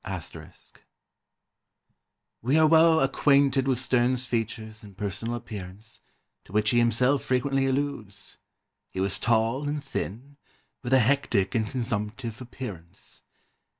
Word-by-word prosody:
*] 95 -4 -6 2.1
"We 130 +7 +2
are 160 - +6
well 160 0 +6
acquainted 135 0 +3
with 130 -2 +2
Sterne's 125 0 +1
features 110 -2 -3
and 100 -3 -14
personal 105 +4 -3
appearance, 105 -2 -8 0.5
to - - -16
which 105 +1 +2
he 120 - +4
himself 125 +4 +2
frequently 135 +1 +1
alludes. 130 -7 -3 0.5
He - - -6
was 95 0 -1
tall 115 +5 +1
and 145 0 -3
thin, 135 +1 -5 0.4
with 120 0 -2
a 130 - +7
hectic 115 -6 +1
and 110 -2 0
consumptive 115 0 -3
appearance. 105 -9 -9
120 Hz, 120 wpm, -27 LUFS, 105-135 Hz, 2.1 s, a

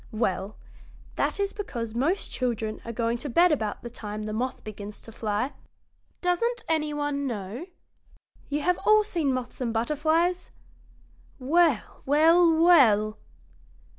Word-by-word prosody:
Well, 200 -2 -2 0.6
that - - -1
is 400 0 -1
because 235 - -5
most 295 - 0
children 225 -4 -2
are 230 - -5
going 230 +1 -1
to 290 - -5
bed 345 +8 +4
about 220 -8 -2
the 240 - -6
time 215 -2 -6
the 215 0 -4
moth 250 +4 -3
begins 205 -1 -8
to 225 - -11
fly. 220 +4 -2 0.7
Doesn't 460 +7 0
any 310 -2 0
one 290 -1 -2
know? 220 - -5 0.8
You 290 +1 -1
have 360 +3 +1
all 430 +1 +5
seen 335 -9 0
moths 255 0 -4
and 240 -2 -1
butterflies? 315 +9 0 0.9
Well, 300 -1 +1
well, 330 +4 +5
well! 255 -11 +5
265 Hz, 135 wpm, -26 LUFS, 225-335 Hz, 0.9 s, all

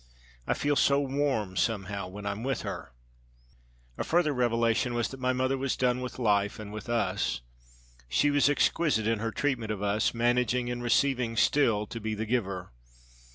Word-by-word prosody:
I - - +1
feel 145 0 +1
so 140 0 +4
warm, 135 -8 -1
somehow, 100 -3 -1
when 100 +2 -9
I'm 100 +1 -3
with 135 -1 -2
her.' - - -6 1.1
A - - 0
further 165 -3 +2
revelation 120 -1 +1
was 120 -1 0
that 135 - -9
my 130 0 +1
mother 130 +1 0
was 135 -1 -1
done 125 0 +1
with 125 - -6
life 105 -4 +1
and 105 -1 -8
with 110 +2 -7
us. 115 - 0 0.7
She 145 - +3
was 145 0 +4
exquisite 145 -5 +2
in 115 -1 +1
her 115 +1 -1
treatment 130 -6 -1
of 105 -1 -4
us, 105 +2 +1
managing 120 +1 +1
in 120 0 -3
receiving 120 -1 +1
still 115 -6 +3
to 115 - -7
be 110 0 -2
the 110 +1 -3
giver. 100 -6 -2
120 Hz, 175 wpm, -29 LUFS, 105-130 Hz, 1.1 s, so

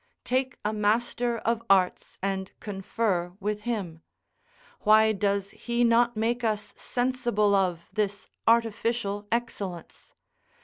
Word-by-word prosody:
Take 260 0 0
a 210 - +1
master 235 +3 +1
of 230 +1 0
arts, 190 -2 +2
and 195 -1 -2
confer 195 -3 -2
with 210 +1 -2
him: 180 -8 -3 0.8
why 220 +1 +5
does 200 -1 0
he 240 0 -1
not 235 0 +3
make 235 +2 0
us 215 -2 -1
sensible 240 -5 0
of 180 -4 +1
this 205 -2 -2 0.2
artificial 225 -2 +1
excellence? 200 -7 -4
215 Hz, 115 wpm, -27 LUFS, 200-235 Hz, 0.8 s, why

